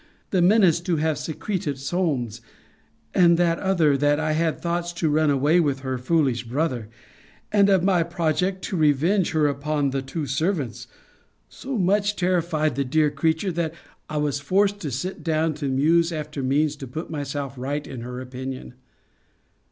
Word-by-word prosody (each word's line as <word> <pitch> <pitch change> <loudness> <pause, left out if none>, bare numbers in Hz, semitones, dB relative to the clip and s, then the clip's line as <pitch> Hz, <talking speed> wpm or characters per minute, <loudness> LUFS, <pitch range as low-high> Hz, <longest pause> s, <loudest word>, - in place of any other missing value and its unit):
The 185 - +2
menace 180 -3 +5
to 175 0 -1
have 155 0 0
secreted 160 -3 -3
Solmes, 135 - -2 0.7
and 170 -2 +5
that 170 -1 +2
other, 170 -7 +2
that 145 +2 +2
I 155 0 0
had 160 0 0
thoughts 175 0 -2
to 165 -3 0
run 155 0 +3
away 145 +5 +3
with 140 -5 0
her 130 -2 -3
foolish 130 -3 +1
brother, 125 -3 -2 0.6
and 200 -1 +4
of 190 -3 +4
my 185 -2 +3
project 175 +2 -1
to 190 - -3
revenge 160 +5 +2
her 155 -1 +3
upon 145 0 0
the 135 0 -1
two 145 +4 -4
servants, 145 - -2 0.6
so 265 -2 -5
much 205 +2 +2
terrified 170 -5 0
the 140 - 0
dear 150 +3 +2
creature, 160 +6 0
that 165 -1 -2 0.3
I 155 - -3
was 145 -1 0
forced 200 +7 +1
to 155 - -4
sit 140 +10 -4
down 160 -1 +1
to 145 -1 -4
muse 160 +6 +3
after 150 -3 -4
means 145 +3 +1
to 135 - -7
put 155 +8 -6
myself 145 -2 -4
right 140 +3 -3
in 125 -3 -7
her 125 +1 -6
opinion. 130 0 -7
155 Hz, 165 wpm, -24 LUFS, 140-175 Hz, 0.7 s, menace